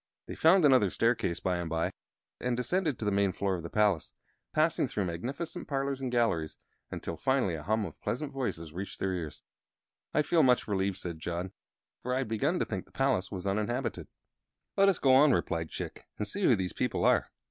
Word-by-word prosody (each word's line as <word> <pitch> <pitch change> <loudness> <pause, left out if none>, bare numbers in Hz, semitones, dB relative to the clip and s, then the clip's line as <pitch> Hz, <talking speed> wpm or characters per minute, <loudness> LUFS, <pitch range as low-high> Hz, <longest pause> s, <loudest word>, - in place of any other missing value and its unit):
They - - -7
found 165 +1 +5
another 130 -8 +5
staircase, 115 -5 +1
by 90 -1 0
and 85 -1 -3
by, 80 +1 0 0.5
and 125 -1 -1
descended 155 +2 0
to 110 - -4
the 105 - +2
main 100 -1 +2
floor 100 +1 -1
of 85 - -5
the 85 - -7
palace, 105 -6 +1 0.4
passing 155 -2 +2
through 105 -6 -2
magnificent 130 - -4
parlors 135 -1 -1
and 130 -2 -2
galleries, 115 -11 +1 0.3
until 85 - -5
finally 130 -7 +1
a 80 - -4
hum 110 +5 0
of 85 - -10
pleasant 140 +3 -3
voices 85 - -3
reached 95 +3 -6
their 95 -1 0
ears. 85 -4 -5 0.7
"I 150 - +2
feel 165 +2 +3
much 125 -3 +4
relieved," 95 -2 0
said 85 -4 -5
John, 85 +3 -3 0.5
"for 125 +1 -1
I 135 0 0
had - - -11
begun 140 +11 +1
to - - 0
think 95 -4 -4
the - - -24
place 135 -9 +1
was 95 -2 -5
uninhabited." 110 +6 -1 0.7
"Let 195 0 +5
us 190 - +2
go 130 -2 +4
on," 140 +1 +7
replied 80 -7 -1
Chick, - - -7
"and 105 - -2
see 200 - -4
who 120 - +6
these 95 -3 -3
people - - 0
are." - - +3
110 Hz, 205 wpm, -30 LUFS, 90-135 Hz, 0.7 s, on